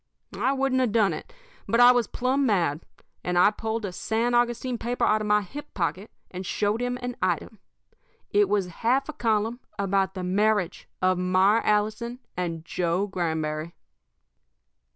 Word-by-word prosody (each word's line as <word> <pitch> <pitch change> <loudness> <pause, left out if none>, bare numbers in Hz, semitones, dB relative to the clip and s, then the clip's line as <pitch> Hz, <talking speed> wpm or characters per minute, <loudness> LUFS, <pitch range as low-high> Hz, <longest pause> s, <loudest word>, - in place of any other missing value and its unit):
"I 265 - +1
wouldn't 270 -1 +1
have 250 -4 +1
done 215 -3 +3
it, - - -8 0.4
but 230 - +2
I 245 0 +9
was 245 -2 +2
plumb 260 +3 0
mad. 175 - +1 0.4
I 180 +3 +4
pulled 220 0 -3
a 195 - -4
San 225 +6 -1
Augustine 240 0 +1
paper 240 +1 -1
out 215 0 +2
of 210 - -3
my 210 0 +3
hip 290 +10 -10
pocket, 185 +3 -2 0.2
and 185 +1 -6
showed 205 +4 -1
him 245 0 -1
an 245 0 -3
item. 170 - -1 0.7
It 205 -1 +3
was 205 -2 +2
a - - -10
half 255 - 0
a - - -4
column 225 0 0 0.2
about 195 -1 0
the 185 - -4
marriage 200 0 0
of 185 -1 +3
Myra 185 +4 +3
Allison 215 +3 0 0.2
and 165 -2 -3
Joe 180 +2 0
Granberry. 160 -4 -3
210 Hz, 165 wpm, -26 LUFS, 185-240 Hz, 0.7 s, I